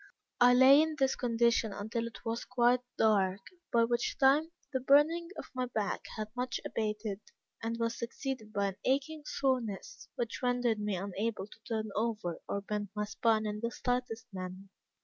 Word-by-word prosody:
I 245 Hz, 0 st, +7 dB
lay 265 Hz, +3 st, +8 dB
in 315 Hz, 0 st, 0 dB
this 270 Hz, -2 st, +2 dB
condition 235 Hz, -2 st, +2 dB
until 225 Hz, +4 st, -3 dB
it 230 Hz, -, -11 dB
was 230 Hz, +1 st, -2 dB
quite 250 Hz, 0 st, +3 dB, 0.2 s
dark, 195 Hz, -3 st, +3 dB, 0.3 s
by 230 Hz, -1 st, +4 dB
which 235 Hz, +1 st, 0 dB
time 285 Hz, +4 st, +4 dB, 0.2 s
the 260 Hz, -, +1 dB
burning 295 Hz, +6 st, +4 dB
of -, -, -5 dB
my 255 Hz, -1 st, -1 dB
back 215 Hz, -4 st, -2 dB
had 215 Hz, 0 st, -3 dB
much 250 Hz, 0 st, -2 dB
abated, 210 Hz, -2 st, -2 dB, 0.4 s
and 230 Hz, +1 st, -2 dB
was 230 Hz, 0 st, -1 dB
succeeded 235 Hz, -2 st, -4 dB
by 200 Hz, -1 st, +1 dB
an 190 Hz, -, -9 dB
aching 285 Hz, +4 st, 0 dB
soreness, 255 Hz, -2 st, -2 dB
which 235 Hz, -2 st, -3 dB
rendered 245 Hz, -3 st, +1 dB
me 210 Hz, -1 st, -1 dB
unable 200 Hz, +3 st, -2 dB
to 215 Hz, -, -16 dB
turn 220 Hz, -1 st, -2 dB
over 215 Hz, -6 st, -1 dB
or 200 Hz, -, -1 dB
bend 205 Hz, 0 st, -3 dB
my 210 Hz, 0 st, -1 dB
spine 220 Hz, +1 st, +1 dB
in 210 Hz, 0 st, -3 dB
the 230 Hz, +1 st, -1 dB
slightest 245 Hz, -2 st, -2 dB
manner. 185 Hz, +1 st, -7 dB
230 Hz, 170 wpm, -32 LUFS, 210-250 Hz, 0.4 s, lay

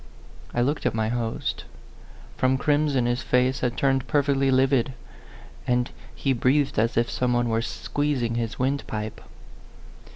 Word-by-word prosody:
I 120 Hz, -, 0 dB
looked 145 Hz, +5 st, 0 dB
at -, -, -1 dB
my 110 Hz, -1 st, 0 dB
host; 115 Hz, -1 st, -2 dB, 0.7 s
from 130 Hz, +1 st, +2 dB
crimson 145 Hz, -2 st, +2 dB
his 120 Hz, +1 st, 0 dB
face 125 Hz, +1 st, +2 dB
had 125 Hz, -1 st, -1 dB
turned 135 Hz, -1 st, +1 dB
perfectly 140 Hz, -2 st, +2 dB
livid, 130 Hz, -1 st, +3 dB, 0.7 s
and 125 Hz, 0 st, +1 dB, 0.2 s
he 135 Hz, -, 0 dB
breathed 135 Hz, +1 st, +2 dB
as 115 Hz, +1 st, +1 dB
if 120 Hz, 0 st, +3 dB
some 125 Hz, 0 st, 0 dB
one 120 Hz, 0 st, +1 dB
were 115 Hz, 0 st, +1 dB
squeezing 130 Hz, -1 st, -1 dB
his 115 Hz, -1 st, -2 dB
windpipe. 125 Hz, -5 st, -2 dB
125 Hz, 140 wpm, -25 LUFS, 120-135 Hz, 0.7 s, livid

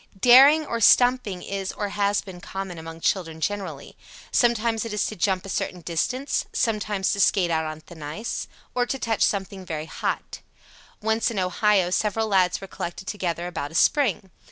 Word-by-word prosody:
Daring 270 Hz, +7 st, +7 dB
or 235 Hz, -4 st, -3 dB
"stumping" 245 Hz, -6 st, +4 dB
is 195 Hz, -1 st, -4 dB
or 205 Hz, -1 st, -4 dB
has 200 Hz, 0 st, +1 dB
been 185 Hz, -3 st, -11 dB
common 190 Hz, -3 st, -6 dB
among 165 Hz, 0 st, -9 dB
children 165 Hz, -4 st, -1 dB
generally. 200 Hz, +4 st, -4 dB, 0.4 s
Sometimes 235 Hz, -2 st, +2 dB
it 230 Hz, -2 st, -5 dB
is 210 Hz, -, 0 dB
to 215 Hz, -, -4 dB
jump 190 Hz, 0 st, 0 dB
a -, -, -8 dB
certain 180 Hz, -1 st, -3 dB
distance; 250 Hz, -, -1 dB
sometimes 210 Hz, -3 st, 0 dB
to 200 Hz, -, -3 dB
skate 185 Hz, -3 st, +3 dB
out 160 Hz, -1 st, 0 dB
on 155 Hz, 0 st, -6 dB
thin 160 Hz, 0 st, -14 dB
ice; 155 Hz, +10 st, -4 dB, 0.3 s
again, 245 Hz, -1 st, +1 dB
to 270 Hz, -, -2 dB
touch 225 Hz, -4 st, -2 dB
something 195 Hz, -1 st, 0 dB
very 155 Hz, -3 st, -5 dB
hot. -, -, -4 dB, 0.6 s
Once 220 Hz, +2 st, +1 dB
in 230 Hz, -, -5 dB
Ohio 185 Hz, 0 st, +2 dB
several 220 Hz, +3 st, 0 dB
lads 185 Hz, -3 st, +2 dB
were 195 Hz, -, -8 dB
collected 185 Hz, -1 st, -6 dB
together 175 Hz, -4 st, -3 dB
about 155 Hz, -5 st, -4 dB
a 160 Hz, -, -12 dB
spring. 205 Hz, -, +2 dB
195 Hz, 180 wpm, -24 LUFS, 175-220 Hz, 0.6 s, Daring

